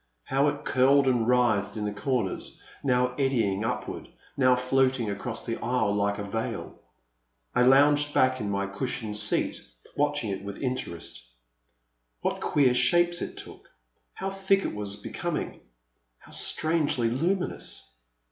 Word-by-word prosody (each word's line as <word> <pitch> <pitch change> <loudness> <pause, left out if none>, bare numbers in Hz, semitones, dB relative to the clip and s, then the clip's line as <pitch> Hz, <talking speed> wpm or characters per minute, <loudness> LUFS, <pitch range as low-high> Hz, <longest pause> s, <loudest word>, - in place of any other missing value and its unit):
How 135 - +2
it 145 - -2
curled 135 +2 +4
and 120 -3 +2
writhed 110 -5 +2
in 105 - -2
the 105 - -2
comers, 115 -2 -2 0.2
now 125 -2 +2
eddying 115 -7 +1
upward, 110 - -4 0.3
now 130 -2 +4
floating 130 -2 +1
across 110 +3 -4
the 115 -1 -2
aisle 115 -4 +1
like 100 0 0
a 100 - -4
veil. 110 +3 -4 0.7
I - - +3
lounged 145 +3 +5
back 130 -2 +3
in 105 - -3
my 100 0 -1
cushioned 110 +1 -4
seat 105 - 0 0.3
watching 145 -7 0
it 95 0 -4
with 100 0 -6
inter 130 -8 -2
est. - - -8 1.0
What - - -2
queer 135 -4 +3
shapes 175 +6 +3
it - - -5
took. - - -10 0.5
How 195 - -3
thick 195 0 +1
it - - -2
was 105 -1 -4
becoming 105 - -4 0.3
— - - -28
^how - - -14
strangely 155 -7 +1
luminous 165 - -2
125 Hz, 145 wpm, -27 LUFS, 105-140 Hz, 1.0 s, lounged